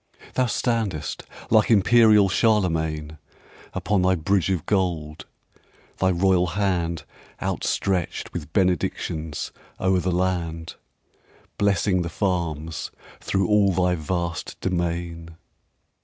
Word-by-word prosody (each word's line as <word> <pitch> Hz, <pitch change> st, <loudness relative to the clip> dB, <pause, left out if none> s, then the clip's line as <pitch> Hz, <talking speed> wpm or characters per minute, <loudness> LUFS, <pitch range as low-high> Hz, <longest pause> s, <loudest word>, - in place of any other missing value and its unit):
Thou 130 Hz, -1 st, +2 dB
standest, 110 Hz, -, -2 dB, 0.3 s
like 110 Hz, -2 st, +5 dB
imperial 110 Hz, -1 st, +6 dB
Charlemagne, 80 Hz, -8 st, +1 dB, 0.6 s
Upon 100 Hz, +1 st, +1 dB
thy 95 Hz, +1 st, +3 dB
bridge 90 Hz, +2 st, +1 dB
of 90 Hz, -5 st, -1 dB
gold; 85 Hz, -6 st, -1 dB, 0.7 s
thy 95 Hz, -, +3 dB
royal 90 Hz, -1 st, +2 dB, 0.9 s
handOutstretched 95 Hz, -4 st, -1 dB
with 80 Hz, -3 st, -6 dB
benedictions 80 Hz, -4 st, -1 dB, 0.3 s
o'er 95 Hz, 0 st, +2 dB
the 90 Hz, +1 st, -1 dB
land, 85 Hz, -2 st, -1 dB, 0.9 s
Blessing 100 Hz, -2 st, +2 dB
the 85 Hz, -, -3 dB
farms 85 Hz, -4 st, -2 dB, 0.3 s
through 95 Hz, -1 st, 0 dB
all 105 Hz, -2 st, +4 dB
thy 90 Hz, 0 st, +2 dB
vast 85 Hz, +1 st, -3 dB
domain. 85 Hz, -2 st, -3 dB
90 Hz, 95 wpm, -24 LUFS, 85-95 Hz, 0.9 s, imperial